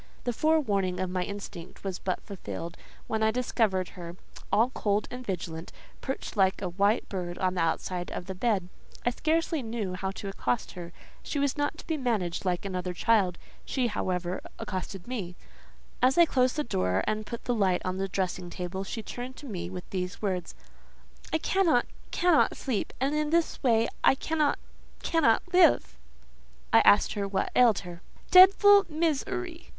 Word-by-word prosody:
The 245 Hz, -, -1 dB
forewarning 210 Hz, -12 st, +1 dB
of 185 Hz, -1 st, -2 dB
my 185 Hz, 0 st, -1 dB
instinct 200 Hz, -2 st, -7 dB
was 190 Hz, -2 st, -3 dB
but 185 Hz, -, -3 dB
fulfilled, 175 Hz, -4 st, -7 dB, 0.3 s
when 220 Hz, 0 st, -2 dB
I 220 Hz, -, +4 dB
discovered 220 Hz, -5 st, 0 dB
her, 175 Hz, -2 st, -9 dB, 0.4 s
all 235 Hz, +4 st, +3 dB
cold 205 Hz, -4 st, 0 dB
and 250 Hz, 0 st, -6 dB
vigilant, 170 Hz, -5 st, -5 dB, 0.3 s
perched 265 Hz, -, -5 dB
like 190 Hz, -2 st, +3 dB
a 185 Hz, -, -3 dB
white 200 Hz, +5 st, +1 dB
bird 180 Hz, -3 st, -4 dB
on 185 Hz, -1 st, 0 dB
the 180 Hz, -, -1 dB
outside 175 Hz, +2 st, -1 dB
of -, -, -5 dB
the 190 Hz, -, -5 dB
bed. 190 Hz, -2 st, 0 dB, 0.4 s
I 245 Hz, -, +3 dB
scarcely 320 Hz, +3 st, 0 dB
knew 220 Hz, -5 st, -3 dB
how 190 Hz, +1 st, -3 dB
to 195 Hz, +1 st, -6 dB
accost 125 Hz, -10 st, -2 dB
her; 175 Hz, -1 st, -8 dB, 0.3 s
she -, -, -4 dB
was 280 Hz, -1 st, +1 dB
not 290 Hz, +1 st, -1 dB
to -, -, -11 dB
be 320 Hz, -, -1 dB
managed 210 Hz, -, -1 dB
like 180 Hz, +2 st, -1 dB
another 180 Hz, -2 st, -3 dB
child. 195 Hz, -4 st, +2 dB, 0.3 s
She, 260 Hz, -2 st, -1 dB
however, 185 Hz, -5 st, -2 dB, 0.2 s
accosted 190 Hz, -1 st, -5 dB
me. 200 Hz, -9 st, -4 dB, 0.7 s
As 255 Hz, +4 st, +4 dB
I 340 Hz, -, +8 dB
closed 255 Hz, -4 st, +2 dB
the 300 Hz, -, 0 dB
door, 90 Hz, -, 0 dB
and 215 Hz, 0 st, -1 dB
put 235 Hz, -, -6 dB
the 245 Hz, -, +1 dB
light 190 Hz, -5 st, +1 dB
on 185 Hz, 0 st, -2 dB
the 195 Hz, 0 st, -1 dB
dressing 185 Hz, -2 st, -2 dB
table, 180 Hz, +2 st, -4 dB
she 220 Hz, +3 st, -5 dB
turned 250 Hz, +3 st, -6 dB
to -, -, -10 dB
me 180 Hz, -8 st, -5 dB
with 180 Hz, -1 st, -7 dB
these 180 Hz, -1 st, -3 dB
words:—"I 190 Hz, -, -6 dB
cannot—cannot 340 Hz, 0 st, +2 dB
sleep; 245 Hz, -7 st, -2 dB
and 270 Hz, +3 st, +1 dB
in 300 Hz, 0 st, 0 dB
this 335 Hz, +1 st, +1 dB
way 230 Hz, -4 st, +3 dB, 0.2 s
I -, -, +6 dB
cannot—cannot 300 Hz, -3 st, 0 dB
live!" 360 Hz, -1 st, +5 dB, 0.8 s
I 225 Hz, -, +9 dB
asked 205 Hz, -, +5 dB
what 200 Hz, -1 st, -1 dB
ailed 235 Hz, -5 st, +5 dB
her. 175 Hz, -2 st, -9 dB, 0.3 s
"Dedful 400 Hz, +2 st, +8 dB
miz 315 Hz, -2 st, +1 dB
er 365 Hz, -1 st, -2 dB
y!" 335 Hz, -1 st, -11 dB
205 Hz, 170 wpm, -28 LUFS, 185-260 Hz, 0.8 s, I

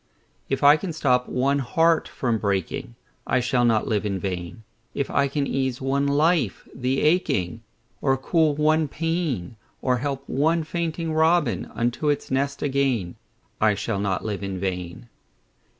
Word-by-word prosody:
If 135 Hz, +1 st, -1 dB
I 145 Hz, +2 st, +8 dB
can 175 Hz, 0 st, -5 dB
stop 125 Hz, -5 st, +1 dB
one 140 Hz, +3 st, +1 dB
heart 165 Hz, +5 st, +2 dB
from 120 Hz, -4 st, -1 dB
breaking, 95 Hz, -, -2 dB, 0.3 s
I 130 Hz, -, +2 dB
shall 120 Hz, 0 st, +1 dB
not 115 Hz, -3 st, +2 dB
live 105 Hz, -2 st, 0 dB
in 100 Hz, -2 st, -1 dB
vain; 90 Hz, +1 st, -5 dB, 0.3 s
If 140 Hz, -, -2 dB
I 140 Hz, 0 st, +2 dB
can 140 Hz, +1 st, -1 dB
ease 130 Hz, -2 st, -1 dB
one 140 Hz, +1 st, 0 dB
life 155 Hz, +3 st, +1 dB
the 130 Hz, +1 st, -1 dB
aching, 115 Hz, -, +1 dB, 0.4 s
Or 135 Hz, -1 st, +2 dB
cool 155 Hz, +2 st, +2 dB
one 155 Hz, +1 st, +2 dB
pain, 150 Hz, -, -2 dB, 0.2 s
Or 125 Hz, -1 st, +1 dB
help 140 Hz, +1 st, -4 dB
one 160 Hz, +4 st, +1 dB
fainting 165 Hz, 0 st, -3 dB
robin 160 Hz, -4 st, +2 dB
Unto 120 Hz, +6 st, -1 dB
his 145 Hz, -2 st, 0 dB
nest 140 Hz, +1 st, -1 dB
again, 135 Hz, -10 st, 0 dB, 0.5 s
I 110 Hz, -1 st, +4 dB
shall 105 Hz, 0 st, -2 dB
not 100 Hz, -2 st, -1 dB
live 105 Hz, -2 st, -3 dB
in 95 Hz, -2 st, -4 dB
vain. 90 Hz, +2 st, -4 dB
135 Hz, 155 wpm, -24 LUFS, 110-150 Hz, 0.5 s, I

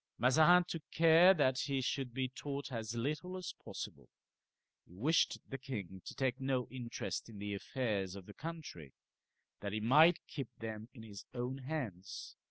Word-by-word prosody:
Mazarin 160 Hz, +9 st, +6 dB
took 165 Hz, -2 st, -4 dB
care 165 Hz, +3 st, +7 dB
that 130 Hz, -5 st, +3 dB
he 135 Hz, -1 st, 0 dB
should 130 Hz, 0 st, -1 dB
be 130 Hz, +2 st, -1 dB
taught 140 Hz, +2 st, -5 dB
as 115 Hz, -1 st, -3 dB
little 155 Hz, +10 st, -2 dB
as 185 Hz, -2 st, -5 dB
possible. -, -, -7 dB, 0.7 s
He 90 Hz, -, -18 dB
wished 150 Hz, -, +3 dB
the 135 Hz, -, -5 dB
king 100 Hz, -8 st, -6 dB
to -, -, -7 dB
take 130 Hz, -1 st, 0 dB
no 130 Hz, -2 st, 0 dB
interest 120 Hz, -2 st, -4 dB
in 110 Hz, -, -10 dB
the 100 Hz, 0 st, -3 dB
affairs 100 Hz, -3 st, -2 dB
of 95 Hz, -2 st, -9 dB
the 105 Hz, -, -11 dB
country, 155 Hz, -, -7 dB, 0.7 s
that 100 Hz, -1 st, -4 dB
he 110 Hz, -, 0 dB
might 150 Hz, +10 st, +6 dB
keep 135 Hz, -6 st, -5 dB
them 110 Hz, 0 st, -6 dB
in 115 Hz, -, -10 dB
his 100 Hz, -3 st, -9 dB
own 125 Hz, +2 st, -2 dB
hands. 125 Hz, -, -5 dB
130 Hz, 170 wpm, -36 LUFS, 110-150 Hz, 0.7 s, care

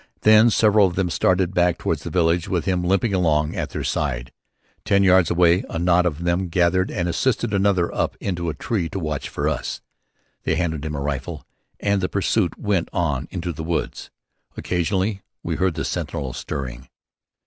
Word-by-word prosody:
Then 110 Hz, +2 st, +6 dB
several 105 Hz, -2 st, +4 dB
of 90 Hz, -, -5 dB
them 90 Hz, -2 st, 0 dB
started 90 Hz, +2 st, +1 dB
back 90 Hz, -1 st, +2 dB
toward -, -, -1 dB
the -, -, -7 dB
village, 85 Hz, -1 st, +1 dB
with 85 Hz, -4 st, -1 dB
him 90 Hz, -2 st, 0 dB
limping 95 Hz, +4 st, +1 dB
along 80 Hz, -4 st, +1 dB
at -, -, -3 dB
their -, -, -4 dB
side. 60 Hz, -5 st, -2 dB, 0.5 s
Ten 100 Hz, 0 st, +3 dB
yards 95 Hz, -2 st, +5 dB
away 85 Hz, +1 st, +3 dB
a -, -, -4 dB
knot 90 Hz, +1 st, +3 dB
of 85 Hz, 0 st, -3 dB
them 90 Hz, +2 st, 0 dB
gathered 90 Hz, +2 st, +2 dB
and 90 Hz, -2 st, -2 dB
assisted 115 Hz, +5 st, 0 dB
another 95 Hz, -3 st, +2 dB
up -, -, -1 dB
into 85 Hz, -3 st, -2 dB
a 80 Hz, -, -4 dB
tree 90 Hz, 0 st, -2 dB
to 95 Hz, -, -4 dB
watch 75 Hz, -4 st, -3 dB
for -, -, -2 dB
us. -, -, -2 dB, 0.6 s
One -, -, 0 dB
handed 80 Hz, -4 st, -2 dB
him 75 Hz, -1 st, -3 dB
a 70 Hz, -, -3 dB
rifle 70 Hz, -2 st, -4 dB, 0.3 s
and 100 Hz, -1 st, +1 dB
the 90 Hz, -, -1 dB
pursuit 100 Hz, -2 st, 0 dB
went 100 Hz, -5 st, 0 dB
on 75 Hz, -6 st, -1 dB
into 90 Hz, -2 st, -4 dB
the 80 Hz, -, -6 dB
wood. 85 Hz, +1 st, -3 dB, 0.5 s
Occasionally 95 Hz, +3 st, -1 dB, 0.2 s
we -, -, -2 dB
heard 95 Hz, -3 st, +1 dB
the 75 Hz, -, -3 dB
sentinel 65 Hz, +1 st, -3 dB
stirring. 65 Hz, -1 st, -6 dB
90 Hz, 185 wpm, -22 LUFS, 80-95 Hz, 0.6 s, Then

